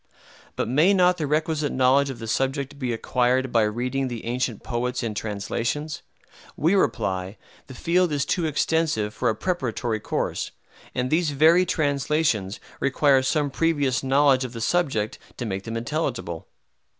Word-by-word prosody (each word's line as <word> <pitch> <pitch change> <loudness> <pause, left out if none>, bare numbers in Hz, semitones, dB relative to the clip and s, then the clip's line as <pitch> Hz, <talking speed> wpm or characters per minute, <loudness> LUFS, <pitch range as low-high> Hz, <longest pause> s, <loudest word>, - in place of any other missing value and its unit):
But - - -1
may 155 - +4
not 180 -1 +4
the 150 - -2
requisite 155 0 0
knowledge 130 +2 +3
of 135 - -5
the 115 - -7
subject 135 +4 -1
be 125 -3 -1
acquired 125 +2 +1
by 115 - +4
reading 125 +5 -1
the 120 -2 -6
ancient 120 -1 -2
poets 125 0 -2
in 115 -2 -2
translations? 115 +9 -3 0.6
We 165 +5 +2
reply, 100 - 0 0.3
the 130 - -10
field 175 +4 +1
is 145 -2 0
too 175 -3 0
extensive 150 -8 0
for 120 - 0
a 110 - 0
preparatory 120 -6 -2
course; - - -2 0.5
and 125 0 -1
these 160 0 +2
very 160 +5 +4
translations 145 - 0 0.2
require 140 0 +3
some 145 +2 0
previous 145 -4 +1
knowledge 135 0 +3
of 130 -1 -6
the 115 - -6
subject 125 -8 0 0.2
to 120 - -4
make 95 -2 -4
them 115 0 -4
intelligible. 120 - -3
130 Hz, 155 wpm, -24 LUFS, 115-155 Hz, 0.6 s, may